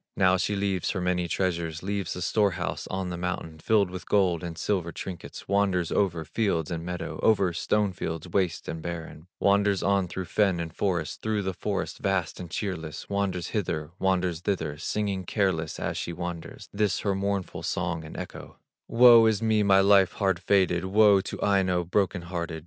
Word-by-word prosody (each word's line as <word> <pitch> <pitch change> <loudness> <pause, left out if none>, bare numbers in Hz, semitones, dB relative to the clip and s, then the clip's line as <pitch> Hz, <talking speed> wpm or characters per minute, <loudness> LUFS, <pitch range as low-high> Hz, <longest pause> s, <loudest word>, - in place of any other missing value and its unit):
Now 95 -1 +4
she 105 +3 0
leaves 100 -3 -1
her 95 - -1
many 90 -1 0
treasures, 85 -2 -2
Leaves 100 -2 -2
the 90 - -4
store 100 0 +2
house 85 - -3
on 95 -1 -3
the 90 -1 -5
mountain, 85 -3 -4
Filled 100 0 +2
with 90 -2 -8
gold 90 -5 +2
and 85 -2 -5
silver 85 -2 -1
trinkets, 90 +1 -8
Wanders 95 -4 +1
over 85 -5 0
field 85 -2 -1
and 80 -1 -3
meadow, 90 +1 -5
Over 100 -5 +3
stone 105 +3 0
fields 80 -1 -4
waste 90 0 -1
and 80 - -5
barren, 80 -1 -7
Wanders 100 0 +3
on 100 -2 +2
through 95 +1 -5
fen 95 -2 +1
and 85 -1 -4
forest, 85 -6 -1
Through 110 -2 -1
the 95 0 -2
forest 95 +1 -3
vast 95 -4 -1
and 90 -2 -7
cheerless, 85 -4 -5
Wanders 95 -3 -1
hither, 80 -7 -2
wanders 90 -3 +1
thither, 85 -6 -2
Singing 100 +1 -2
careless 90 -5 -1
as - - -2
she 85 - -3
wanders, 85 -1 -6
This 105 -1 0
her 100 - 0
mournful 100 -1 -2
song 85 -2 -2
and 80 - -9
echo: - - -8 0.3
"Woe 115 -1 +7
is 110 -2 +2
me, 110 -1 +3
my 95 -1 +5
life 100 -1 +5
hard 95 -4 0
fated! 90 -2 +2
Woe 100 0 +5
to - - -6
Aino, 95 -3 +2
broken 90 0 0
hearted! 85 -2 -4
95 Hz, 185 wpm, -27 LUFS, 85-100 Hz, 0.3 s, Woe